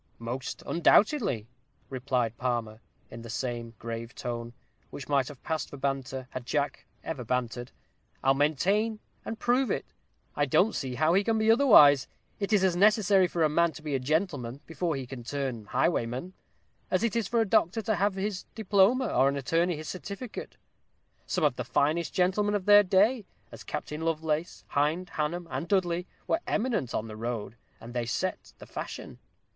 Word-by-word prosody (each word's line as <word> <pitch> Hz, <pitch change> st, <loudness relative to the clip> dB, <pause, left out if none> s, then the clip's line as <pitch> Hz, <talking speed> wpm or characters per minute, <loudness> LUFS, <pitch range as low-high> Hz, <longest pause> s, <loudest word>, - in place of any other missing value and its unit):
"Most 120 Hz, +3 st, -5 dB
undoubtedly," 175 Hz, -, +3 dB, 0.4 s
replied 125 Hz, -3 st, -1 dB
Palmer, 115 Hz, -3 st, -2 dB, 0.3 s
in 115 Hz, -, -8 dB
the 115 Hz, -, -9 dB
same 120 Hz, -1 st, -4 dB
grave 115 Hz, +1 st, -6 dB
tone, 120 Hz, -1 st, -5 dB, 0.4 s
which 140 Hz, -, -8 dB
might 140 Hz, -3 st, +2 dB
have 145 Hz, -4 st, -11 dB
passed 160 Hz, -3 st, -2 dB
for 145 Hz, -, -9 dB
banter, 135 Hz, -1 st, -3 dB
had 130 Hz, -, -5 dB
Jack 145 Hz, +3 st, -2 dB, 0.2 s
ever 140 Hz, -6 st, -4 dB
bantered. 120 Hz, 0 st, -2 dB, 0.5 s
"I'll 135 Hz, -, +5 dB
maintain 195 Hz, +10 st, +1 dB, 0.2 s
and 225 Hz, -, -5 dB
prove 250 Hz, +3 st, +2 dB
it. -, -, -3 dB, 0.4 s
I 145 Hz, 0 st, +1 dB
don't 195 Hz, -, +3 dB
see 130 Hz, -3 st, -3 dB
how 155 Hz, +5 st, +3 dB
he 195 Hz, +2 st, +4 dB
can 225 Hz, +1 st, +1 dB
be 220 Hz, +1 st, +4 dB
otherwise. 150 Hz, -, +7 dB, 0.3 s
It 200 Hz, 0 st, -2 dB
is 205 Hz, -3 st, +4 dB
as 185 Hz, -2 st, +3 dB
necessary 200 Hz, -1 st, +4 dB
for 170 Hz, -1 st, 0 dB
a -, -, +5 dB
man 170 Hz, +2 st, +2 dB
to 155 Hz, -, -11 dB
be 150 Hz, -2 st, -3 dB
a 135 Hz, -, +1 dB
gentleman 140 Hz, -3 st, -1 dB
before 165 Hz, -1 st, -2 dB
he 135 Hz, -1 st, -4 dB
can 125 Hz, -1 st, -8 dB
turn 130 Hz, -4 st, -3 dB
highwayman, 130 Hz, -, -1 dB, 0.6 s
as 185 Hz, +4 st, +1 dB
it 230 Hz, -2 st, 0 dB
is 230 Hz, -5 st, 0 dB
for 235 Hz, -, +1 dB
a 225 Hz, -, +3 dB
doctor 195 Hz, +2 st, +2 dB
to 220 Hz, -, +1 dB
have 200 Hz, +1 st, +1 dB
his 195 Hz, -1 st, -3 dB
diploma, 215 Hz, +4 st, +3 dB
or 135 Hz, -, +3 dB
an 140 Hz, -, -2 dB
attorney 165 Hz, +6 st, +1 dB
his 155 Hz, 0 st, -7 dB
certificate. 200 Hz, +5 st, -7 dB, 0.7 s
Some 180 Hz, -, -1 dB
of 145 Hz, -5 st, +2 dB
the -, -, -2 dB
finest 155 Hz, +4 st, +1 dB
gentlemen 205 Hz, +3 st, +1 dB
of 195 Hz, -3 st, -2 dB
their 205 Hz, 0 st, +8 dB
day, 205 Hz, +4 st, +2 dB, 0.2 s
as -, -, -10 dB
Captain 150 Hz, +1 st, -5 dB
Lovelace, 160 Hz, 0 st, -2 dB
Hind, 155 Hz, +6 st, 0 dB
Hannum, 165 Hz, +3 st, -2 dB
and 170 Hz, -, -3 dB
Dudley, 180 Hz, -2 st, +1 dB, 0.2 s
were 330 Hz, -, 0 dB
eminent 215 Hz, -, -1 dB
on 110 Hz, -, -2 dB
the 110 Hz, -, -8 dB
road, 115 Hz, 0 st, -4 dB, 0.2 s
and 120 Hz, +1 st, -10 dB
they 120 Hz, -2 st, -2 dB
set 115 Hz, -, -3 dB
the -, -, -11 dB
fashion. -, -, -7 dB
155 Hz, 180 wpm, -28 LUFS, 130-195 Hz, 0.7 s, their